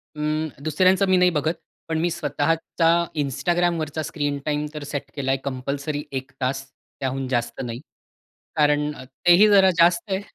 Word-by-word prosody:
अं, 155 +1 -1 0.2
दुसऱ्यांचं 185 +6 +3
मी 185 - +5
नाही 180 0 +5
बघत. 155 +1 0 0.3
पण 160 -1 -1
मी 175 - +1
स्वतःच्या 165 0 0 0.3
Instagramवरचा 160 +2 0
स्क्रीन 145 -2 -2
टाईम 150 0 -1
तर 150 - -6
सेट 140 -1 -5
केलाय 135 -1 0
कंपल्सरी 140 +3 -3 0.2
1 130 0 -16
तास, 135 +1 -1 0.4
त्याहून 135 0 -2
जास्त 120 -2 -2
नाही. 120 -1 -5 0.8
कारण 150 -1 +2
तेही 175 +9 +4
जरा 195 -2 +6
जास्त 170 0 +4
आहे. 190 - +1
150 Hz, 145 wpm, -23 LUFS, 140-170 Hz, 0.8 s, जरा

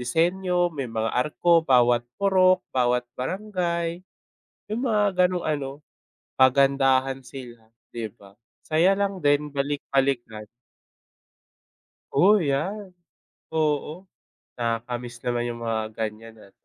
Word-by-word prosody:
disenyo, 175 +6 +1
may 135 -5 -4
mga 115 0 -2
arko 160 +6 +3
bawat 120 -5 +3
purok, 185 -2 +3
bawat 125 -1 +1
barangay, 170 +1 -3 0.7
yung 235 +3 -2
mga 205 -4 +2
ganong 180 -2 -3
ano 145 -3 -1 0.7
pagandahan 135 0 +3
sila 120 -2 -11 0.3
di 115 -3 -4
ba? 100 0 -19 0.2
Saya 165 +4 +2
lang 195 -3 -2
din 145 +1 +3
balik-balikan. 135 -6 -1 1.7
O 205 +3 +5
yan. 185 +6 -2 0.6
Oo, 155 +3 -1 0.5
nakaka-miss 120 +1 -3
naman 120 -1 -1
yung 120 0 -6
mga 115 -1 -1 0.2
ganyan 110 +1 -5
at 100 - -17
140 Hz, 105 wpm, -25 LUFS, 120-180 Hz, 1.7 s, O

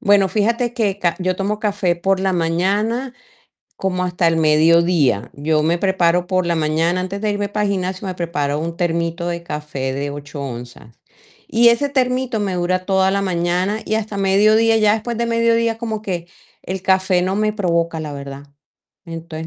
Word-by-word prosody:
Bueno, 200 -1 +4
fíjate 230 +4 0
que 205 -5 0
ca 175 -3 0
yo 185 0 0
tomo 205 +2 -2
café 200 -5 0
por 190 +2 0
la 190 0 +1
mañana 200 +9 0 0.6
como 185 -1 -1
hasta 175 -1 0
el 165 0 +2
mediodía. 155 - +3
Yo 150 +1 0
me 170 +2 +2
preparo 180 -2 +1
por 185 -1 +1
la 170 -1 0
mañana 160 +3 +1
antes 195 +2 -5
de 215 - 0
irme 205 0 -2
para 210 +1 -1
el 200 - 0
gimnasio, 185 0 -3
me 185 - -4
preparo 150 -5 -2
un 165 +1 -4
termito 170 0 -1
de 170 -1 -3
café 150 -5 -4
de 140 +1 -3
8 145 0 -7
onzas, 120 -3 -8 0.5
y 235 +1 +5
ese 235 +5 +2
termito 255 -3 0
me 195 -3 -1
dura 185 +1 -1
toda 190 -1 +2
la 200 - 0
mañana 180 +2 0
y 220 - 0
hasta 215 -2 -3
mediodía. 215 +3 +4
Ya 210 -1 +4
después 225 +1 -3
de 235 - 0
mediodía 230 0 +2
como 220 -2 -4
que 180 -5 -4 0.4
el 190 0 -4
café 190 -1 +2
no 185 +2 0
me 215 0 +1
provoca, 170 -5 0
la 150 -1 -5
verdad. 140 0 -8 0.6
Entonces, 165 -1 -7
185 Hz, 185 wpm, -19 LUFS, 165-210 Hz, 0.6 s, y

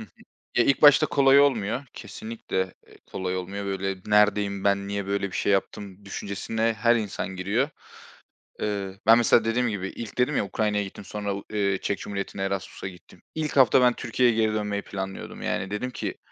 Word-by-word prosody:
Hı - - -6
hı. - - -19 0.5
Eee 120 - +5
ilk 140 - +2
başta 145 -2 +8
kolay 140 0 +5
olmuyor, 125 -2 +1
kesinlikle, 95 -5 -5
eee, - - -18
kolay 95 0 -3
olmuyor. 100 +2 -5
Böyle 95 0 -2
neredeyim, 105 -1 +2
ben 100 0 +1
niye 100 -1 -3
böyle 100 0 -1
bir - - -3
şey 100 - +1
yaptım 100 0 -3
düşüncesine 110 +3 -2
her 120 +1 +4
insan 105 -3 -3
giriyor. 105 +10 0 0.9
Iıı, 100 -2 -3
ben 115 +1 +8
mesela 115 -1 +4
dediğim 120 +2 +1
gibi 95 -3 -3
ilk 115 0 -8
dedim 125 +4 +2
ya - - +1
Ukrayna'ya 105 0 0
gittim, 95 0 -9
sonra 100 -1 -3
u 100 - -7
eee, 100 -2 +1
Çek 100 - -1
Cumhuriyeti'ne 100 -1 -4
Erasmus'a 95 0 -4
gittim. 90 -2 -14
İlk 155 -2 -2
hafta 130 -1 +6
ben 125 -1 +5
Türkiye'ye 120 0 +1
geri 110 -1 +2
dönmeyi 105 -1 -2
planlıyordum 95 -1 -6
yani 95 - -2
dedim 125 +5 -3
ki - - -5
105 Hz, 185 wpm, -25 LUFS, 100-115 Hz, 0.9 s, başta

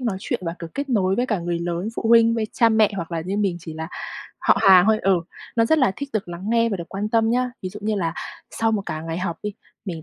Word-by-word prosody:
nói 230 -6 -1
chuyện - - -2
và 165 0 -3
cực 170 -1 -9
kết 280 +1 -3
nối 190 -6 +2
với 245 +4 0
cả 215 -5 0
người 170 0 -2
lớn, 175 +3 -2
phụ - - -3
huynh, 230 0 +6
với 225 -2 -1
cha 230 -3 +4
mẹ, 220 -2 +4
hoặc 170 -2 -5
là 165 - -1
như 185 +5 -3
mình 200 -4 0
chỉ 165 -1 -8
là 160 +1 -5 0.5
họ - - +3
hàng 190 -3 +8
thôi 220 0 +4
ừ, 190 -2 +3 0.4
nó 230 - +4
rất 315 +7 +3
là 260 -9 +3
thích 280 - -5
được 210 -4 -2
lắng 175 +1 -7
nghe 230 0 +3
và 205 - -1
được 170 -1 -7
quan 200 +2 -3
tâm 225 0 +2
nhá. 250 +1 +1
Ví 185 - -3
dụ 205 +3 -10
như 215 +1 0
là, 170 -5 -1 0.4
sau 225 0 0
một 210 -2 0
cả 155 - -3
ngày 165 +1 -4
học 180 -2 -2
đi, 210 - -3 0.3
mình 170 -6 -5
200 Hz, 285 wpm, -23 LUFS, 175-225 Hz, 0.5 s, hàng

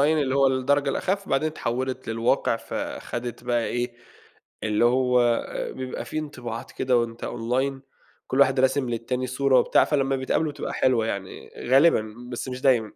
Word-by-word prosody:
اللي 145 -2 +2
هو 135 0 +4
الدرجة 140 +2 +2
الأخف، 195 +7 -1
بعدين 135 +3 +1
اتحولت 130 -3 -3
للواقع، 115 +2 +1
فخدت 120 +1 -5
بقى 120 -2 +1
إيه، 120 0 -2 0.7
اللي 105 +1 +1
هو 125 -1 +3 0.3
بيبقى 130 -1 -5
في 155 - -4
انطباعات 125 -6 -6
كده 130 -1 +1
وأنت 115 0 -3
Online، 130 +4 -1 0.5
كلّ 135 - 0
واحد 135 -1 +4
راسم 130 0 +2
للتاني 125 +2 -2
صورة 130 +1 +3
وبتاع، - - +4
فلمّا 135 -2 +1
بيتقابلوا 145 +4 0
بتبقى - - -5
حلوة 115 -4 +2
يعني، 100 -3 -5 0.2
غالبًا، 130 -6 +4 0.2
بس 125 +2 -5
مش 125 0 -5
دايمًا. 120 -5 +2
130 Hz, 155 wpm, -25 LUFS, 120-135 Hz, 0.7 s, هو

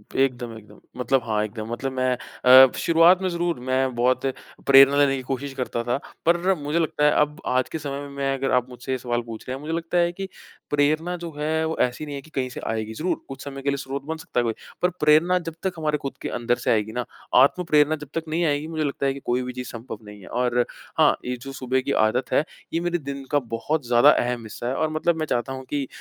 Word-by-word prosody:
एकदम, 125 -3 0
एकदम। 105 -1 -15 0.2
मतलब 125 +1 +1
हाँ 105 -2 0
एकदम, 110 +1 -7
मतलब 125 +3 -3
मैं 130 -1 +1 0.5
अ, 130 - -2
शुरुआत 170 +3 +5
में 190 - 0
ज़रूर 170 -4 -1
मैं 130 -1 +1
बहुत 125 +3 +2 0.4
प्रेरणा 135 +1 +8
लेने 140 -1 +4
की 130 - -4
कोशिश 135 +2 -4
करता 125 -3 -3
था, 120 +2 0 0.3
पर 175 +3 +3
मुझे 150 +3 -1
लगता 155 -2 +1
है 150 - +6
अब 150 0 -1
आज 130 0 +1
के 160 - -4
समय 140 -1 -4
में 145 - -8
मैं 135 -1 0
अगर 135 0 -1
आप 125 0 +2
मुझसे 125 +1 -7
ये 130 - +1
सवाल 120 -1 -2
पूछ 115 -2 -8
रहे 130 - -3
हैं, 135 - -9
मुझे 160 +2 -4
लगता 165 +1 -1
है 175 0 +3
कि 195 +2 -6 0.4
प्रेरणा 155 +4 +1
जो 170 -1 -7
है, 160 +2 0
वो 160 0 -2
ऐसी 125 +4 0
नहीं 145 -1 -6
है 140 - -5
कि 160 - -18
कहीं 130 -1 -1
से - - -7
आएगी, 110 -1 -2
ज़रूर। 165 +10 -2
कुछ 135 0 -8
समय 140 -1 -7
के 140 - 0
लिए 140 - 0
स्रोत 135 0 -5
बन 160 +1 -3
सकता 160 -6 -3
है - - +2
कोई, 115 -1 0 0.3
पर 180 - +3
प्रेरणा 155 +4 +4
जब 160 - -13
तक 190 -2 0
हमारे 150 -1 0
खुद 135 -1 -6
के - - -3
अंदर 120 +1 +1
से - - +3
आएगी 110 -1 +1
ना, 125 +1 -3 0.3
आत्म 140 +8 +5
प्रेरणा 150 -2 +3
जब 150 -2 -10
तक 165 - -1
नहीं 165 +3 0
आएगी, 145 0 0
मुझे 160 -1 -2
लगता 140 -1 -2
है 135 - +2
कि 140 - -8
कोई 125 +1 +1
भी 125 0 -5
चीज़ 125 0 -6
संभव 115 -1 -7
नहीं 105 0 -11
है। - - -13
और 120 0 +1 0.3
हाँ, - - +5
ये 125 0 -2
जो 135 +1 -7
सुबह 130 0 -1
की 140 - -3
आदत 125 +4 -1
है, - - +4 0.3
यह 165 - 0
मेरे 175 0 0
दिन 140 -2 -6
का 145 - +4 0.2
बहुत 145 +3 -2
ज़्यादा 120 +4 +6
अहम 120 -1 0
हिस्सा 110 +2 -6
है 130 - -1
और 155 +2 0
मतलब 160 +2 +1
मैं 155 - 0
चाहता 135 -1 -1
हूँ 130 0 -7
कि 140 -3 -2
135 Hz, 260 wpm, -24 LUFS, 125-155 Hz, 0.5 s, प्रेरणा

